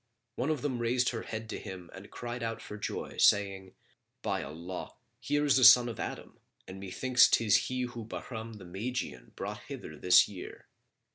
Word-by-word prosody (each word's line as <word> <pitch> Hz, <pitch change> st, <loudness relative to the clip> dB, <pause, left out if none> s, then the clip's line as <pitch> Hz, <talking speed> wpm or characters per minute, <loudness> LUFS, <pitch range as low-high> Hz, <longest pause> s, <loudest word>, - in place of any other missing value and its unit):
One 130 Hz, +5 st, -1 dB
of 150 Hz, -4 st, -1 dB
them 130 Hz, -5 st, -1 dB
raised 120 Hz, +1 st, +2 dB
her 115 Hz, -, -4 dB
head 110 Hz, 0 st, -6 dB
to -, -, -4 dB
him 90 Hz, -2 st, -9 dB
and 100 Hz, +2 st, -11 dB
cried 120 Hz, +2 st, -6 dB
out 115 Hz, -1 st, -3 dB
for 105 Hz, -, -8 dB
joy 105 Hz, -, -5 dB
saying, 95 Hz, -2 st, +3 dB, 0.5 s
"By -, -, -1 dB
Allah, 85 Hz, +6 st, -7 dB, 0.2 s
here 145 Hz, +5 st, 0 dB
is 140 Hz, -2 st, +4 dB
a -, -, +2 dB
son 125 Hz, 0 st, +9 dB
of 115 Hz, -, -6 dB
Adam, -, -, -6 dB, 0.3 s
and 95 Hz, 0 st, -8 dB
methinks 120 Hz, +6 st, +4 dB
'tis 110 Hz, -3 st, +3 dB
he 130 Hz, 0 st, -2 dB
whom 120 Hz, -3 st, -6 dB
Bahram 115 Hz, -1 st, -6 dB
the 105 Hz, -4 st, -11 dB
Magian 95 Hz, -, -5 dB
brought -, -, -5 dB
hither 75 Hz, -, -8 dB
this 90 Hz, 0 st, +6 dB
year!" 100 Hz, -3 st, -9 dB
115 Hz, 185 wpm, -31 LUFS, 95-125 Hz, 0.5 s, son